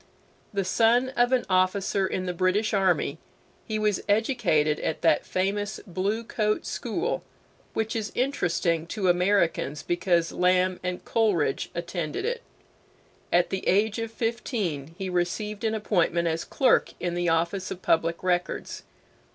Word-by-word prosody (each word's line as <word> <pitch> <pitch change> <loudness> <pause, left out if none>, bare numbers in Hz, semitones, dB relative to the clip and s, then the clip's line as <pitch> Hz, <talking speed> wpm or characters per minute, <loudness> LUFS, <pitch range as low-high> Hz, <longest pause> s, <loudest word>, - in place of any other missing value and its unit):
The 195 -2 -1
son 235 +6 +3
of 245 -1 +2
an 255 -1 +2
officer 190 +1 +2
in 185 0 -3
the 180 - -2
British 185 +5 +1
army, 180 -6 +1 0.5
he 215 - -1
was 210 -2 +1
educated 205 - +2
at - - -3
that 160 -3 +3
famous 205 +3 -1
Blue 200 +5 -2
Coat 215 -2 -1
School 345 - -2 0.5
which 220 0 -1
is 220 -2 -2
interesting 175 - 0
to 190 0 0
Americans 175 -5 +1
because 175 -1 +1
Lamb 180 0 +2
and 180 0 -4
Coleridge 200 -11 +1
attended 170 - -3
it. 480 0 -2 0.9
At 175 0 +3
the 190 -1 -3
age 210 +3 +2
of 225 0 -3
fifteen 205 - -3
he 190 -1 -4
received 185 +4 -2
an 220 0 +1
appointment 175 -5 +1
as 165 0 -1
clerk 265 -3 +2
in 175 -1 -2
the 175 0 0
office 170 +4 0
of 185 - -7
Public 165 +1 +1
Records. 180 0 -1
185 Hz, 145 wpm, -26 LUFS, 175-215 Hz, 0.9 s, son